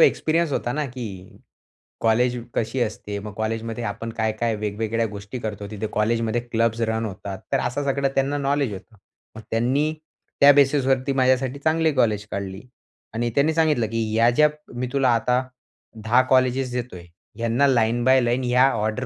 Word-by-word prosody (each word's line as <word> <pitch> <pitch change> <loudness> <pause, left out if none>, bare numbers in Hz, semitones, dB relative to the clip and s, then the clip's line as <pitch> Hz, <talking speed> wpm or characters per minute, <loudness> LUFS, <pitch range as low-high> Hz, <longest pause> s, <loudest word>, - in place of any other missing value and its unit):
Experience 165 - +3
होता 120 - -1
ना, 150 0 -1
की 110 -8 -8 0.6
कॉलेज 120 +2 +2 0.2
कशी 115 +3 -2
असते. 105 -2 -3
मग 105 0 -8
कॉलेजमध्ये 115 +2 -3
आपण 105 +3 -4
काय-काय 110 0 -1
वेगवेगळ्या 110 +2 -2
गोष्टी 100 +3 -7
करतो 105 -3 -5
तिथे 105 +1 -4
कॉलेजमध्ये 115 +2 0
क्लब्स 115 -1 -1
रन 110 0 -1
होतात. 95 -1 -6
तर - - +2
असं 125 +4 -2
सगळं 140 0 0
त्यांना 135 +2 +1
नॉलेज 140 -5 0
होतं. 110 +4 -11 0.4
मग 110 - -8
त्यांनी, 135 +7 +1 0.5
त्या 140 - +9
बेसिसवरती 135 -1 +2
माझ्यासाठी 130 +1 +2
चांगली 160 0 +1
कॉलेज 105 -4 +1
काढली. 100 0 -5 0.5
आणि 120 +1 -1
त्यांनी 150 +3 +3
सांगितलं 150 -8 +2
की 115 0 -1
ह्या 115 +2 +4
ज्या 150 +5 +4 0.3
मी 125 +1 -2
तुला 135 -2 +2
आता 125 +3 +1 0.6
10 120 +4 +4
कॉलेजेस 130 0 +2
देतोय 120 -8 -5 0.3
ह्यांना 115 +5 +2
लाईन 120 -2 +2
बाय 130 0 +5
लाईन 120 +2 0
या 125 +2 +4
ऑर्डर 110 +4 -2
120 Hz, 160 wpm, -23 LUFS, 110-135 Hz, 0.6 s, त्या